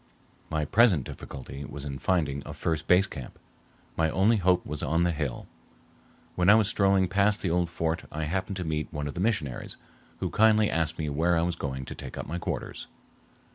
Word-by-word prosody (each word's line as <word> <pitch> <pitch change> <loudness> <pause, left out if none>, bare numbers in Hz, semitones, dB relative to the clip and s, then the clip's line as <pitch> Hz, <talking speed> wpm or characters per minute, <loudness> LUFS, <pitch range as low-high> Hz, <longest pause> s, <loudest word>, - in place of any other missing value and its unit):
My 80 -1 -1
present 100 - +4
difficulty 70 +2 -8
was 70 0 -7
in 70 -1 -5
finding 75 -7 0
a - - -8
first 80 -2 -2
base 90 +2 +5
camp. 70 -10 -9 0.6
My 80 -1 +2
only 100 +7 +3
hope 90 -2 +2
was 75 -1 -4
on 80 +2 +1
the 90 - +2
hill. 75 -6 -3 0.9
When 90 +1 +2
I 105 - +9
was 110 -2 +4
strolling 95 -3 +3
past 100 +3 +2
the 90 - 0
old 85 0 +1
fort 80 0 -2
I 80 +1 -3
happened 95 +5 -2
to 90 - -3
meet 75 -2 -2
one 75 -2 -3
of 70 - -5
the - - -6
missionaries, 95 - -1 0.4
who - - -3
kindly 110 -1 +4
asked 80 0 0
me 80 - -2
where 85 +4 +2
I 80 - +2
was 85 0 -1
going 65 -4 -4
to - - -6
take - - -8
up - - -4
my 85 +4 -4
quarters. - - -4
85 Hz, 205 wpm, -28 LUFS, 75-95 Hz, 0.9 s, I